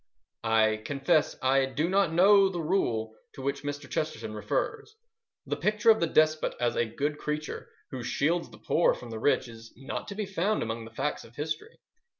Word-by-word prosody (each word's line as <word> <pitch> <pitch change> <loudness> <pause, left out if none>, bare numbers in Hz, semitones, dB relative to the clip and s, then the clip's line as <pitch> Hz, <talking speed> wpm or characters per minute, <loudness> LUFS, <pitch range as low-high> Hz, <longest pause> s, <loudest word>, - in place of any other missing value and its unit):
I 110 -1 +4
confess 145 +4 +1
I 135 +1 +3
do 145 +5 -1
not 195 -2 +2
know 195 +3 +6
the 180 -2 -4
"rule" 120 - 0 0.2
to 135 - -8
which 140 +1 -2
Mr. 145 -1 -5
Chesterton 155 -9 -3
refers. 425 - -3 0.5
The - - -2
picture 215 +2 +3
of 220 - +3
the 170 - +1
despot 155 0 +2
as 120 0 +1
a 120 - +2
good 145 +6 -3
creature 150 0 -4 0.2
who 130 -3 -5
shields 160 +8 0
the - - -14
poor 170 - +2
from 120 -1 -10
the 110 - -5
rich 135 +1 +2
is 115 0 -12
not 135 - -5
to 200 - -6
be 210 0 -2
found 195 +2 0
among 115 0 -4
the 115 - -11
facts 150 - -2
of 115 - -16
history. 155 - -5
150 Hz, 190 wpm, -28 LUFS, 120-175 Hz, 0.5 s, know